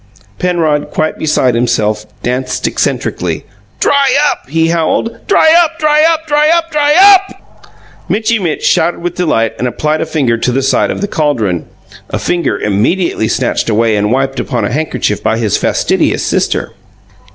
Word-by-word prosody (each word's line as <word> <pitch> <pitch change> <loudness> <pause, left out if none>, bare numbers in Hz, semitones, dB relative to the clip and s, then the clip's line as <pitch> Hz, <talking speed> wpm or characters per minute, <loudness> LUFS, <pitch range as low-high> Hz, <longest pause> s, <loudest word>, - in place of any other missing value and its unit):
Penrod, 165 -5 0
quite 155 0 -2
beside 135 -5 +1
himself, 110 -3 0 0.2
danced 125 +2 -2
eccentrically. - - -2 0.3
"Dry 280 -1 +2 0.2
up!" - - -8
he 165 +2 +1
howled. 170 +7 -1
"Dry 320 -5 +4
up, 330 0 -4
dry 305 -2 +2
up, 320 0 -2
dry 300 0 +2
up, 335 0 +1
dry 295 -1 +2
UP!" 390 +1 +3 0.4
Mitchy 220 +1 +1
Mitch 170 -5 -3
shouted 175 - +1
with 175 0 -2
delight 115 -12 0
and 125 - 0
applied 150 +6 -1
a - - -2
finger 135 -8 0
to 125 - 0
the 135 +2 -1
side 135 - +1
of - - -4
the 205 - -1
caldron 115 - -1 0.4
a - - -2
finger 175 -1 -1
immediately 110 - 0
snatched 125 -1 -1
away 110 0 +2
and 105 +1 0
wiped 135 +1 -1
upon 125 - -2
a - - -3
handkerchief 130 -8 -2
by 110 - 0
his 110 -4 0
fastidious - - 0
sister. - - -1
155 Hz, 165 wpm, -12 LUFS, -, 0.4 s, Dry